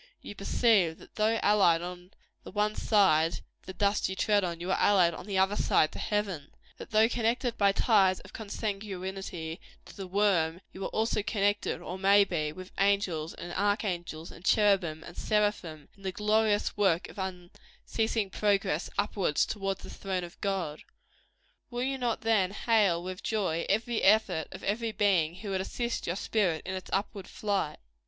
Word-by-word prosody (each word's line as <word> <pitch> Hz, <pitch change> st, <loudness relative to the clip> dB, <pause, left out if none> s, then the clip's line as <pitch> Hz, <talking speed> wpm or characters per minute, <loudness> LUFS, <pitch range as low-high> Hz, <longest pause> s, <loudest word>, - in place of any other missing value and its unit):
You -, -, -9 dB
perceive 195 Hz, -4 st, +2 dB
that, -, -, -16 dB
though 220 Hz, +1 st, +1 dB
allied 185 Hz, -5 st, +4 dB
on 180 Hz, 0 st, -8 dB, 0.3 s
the -, -, -9 dB
one 210 Hz, +1 st, 0 dB
side 170 Hz, -8 st, +3 dB
to -, -, -7 dB, 0.2 s
the 190 Hz, -, -6 dB
dust 200 Hz, +1 st, +1 dB
you 190 Hz, -, -4 dB
tread 205 Hz, +1 st, +2 dB
on, 170 Hz, -2 st, -3 dB
you 180 Hz, +2 st, -3 dB
are -, -, +1 dB
allied 180 Hz, -4 st, +4 dB
on 160 Hz, -, -9 dB
the 195 Hz, -2 st, -2 dB
other 190 Hz, +2 st, +3 dB
side 155 Hz, -, +2 dB
to -, -, -8 dB
heaven; 195 Hz, -8 st, -2 dB, 0.3 s
that -, -, -9 dB
though 220 Hz, 0 st, +5 dB
connected 235 Hz, +1 st, 0 dB
by 200 Hz, -2 st, +4 dB
ties 195 Hz, -3 st, +3 dB
of -, -, -15 dB
consanguinity 195 Hz, -5 st, -5 dB, 0.3 s
to -, -, -13 dB
the 195 Hz, -2 st, -7 dB
worm 180 Hz, -4 st, +1 dB
you 190 Hz, -, -7 dB
are -, -, -2 dB
also 220 Hz, -1 st, 0 dB
connected, 205 Hz, 0 st, 0 dB
or 185 Hz, -, -6 dB
may 200 Hz, +1 st, +6 dB
be, 155 Hz, -6 st, -2 dB
with 185 Hz, +4 st, -10 dB
angels 195 Hz, -5 st, +1 dB
and 175 Hz, -, -7 dB
archangels, 185 Hz, -5 st, -2 dB
and 165 Hz, -, -14 dB
cherubim 190 Hz, -7 st, +2 dB
and 170 Hz, -, -11 dB
seraphim, 205 Hz, -8 st, -1 dB
in 200 Hz, -, -21 dB
the 190 Hz, -1 st, -3 dB
glorious 210 Hz, +1 st, +1 dB
work 190 Hz, -5 st, +2 dB
of -, -, -11 dB
unceasing 190 Hz, +3 st, -4 dB
progress 195 Hz, -6 st, 0 dB
upward 200 Hz, -6 st, 0 dB
toward 195 Hz, +1 st, 0 dB
the -, -, -11 dB
throne 190 Hz, -2 st, -3 dB
of 175 Hz, 0 st, -11 dB
God. 190 Hz, -7 st, -2 dB, 0.9 s
Will 245 Hz, 0 st, -3 dB
you 270 Hz, 0 st, -2 dB
not, 240 Hz, -2 st, -1 dB
then, 220 Hz, -5 st, +2 dB
hail 200 Hz, -5 st, +2 dB
with 185 Hz, 0 st, -6 dB
joy, 185 Hz, -7 st, -1 dB
every 225 Hz, +3 st, 0 dB
effort 195 Hz, -5 st, +3 dB
of -, -, -9 dB
every 225 Hz, +3 st, -1 dB
being 185 Hz, -7 st, +2 dB
who 200 Hz, +2 st, -6 dB
would 190 Hz, -1 st, 0 dB
assist 235 Hz, +4 st, -3 dB
your 175 Hz, -, -1 dB
spirit 190 Hz, -6 st, 0 dB
in 190 Hz, -, -4 dB
its 185 Hz, -1 st, -6 dB
upward 200 Hz, -1 st, -2 dB
flight? 200 Hz, -7 st, -2 dB
195 Hz, 175 wpm, -29 LUFS, 180-210 Hz, 0.9 s, may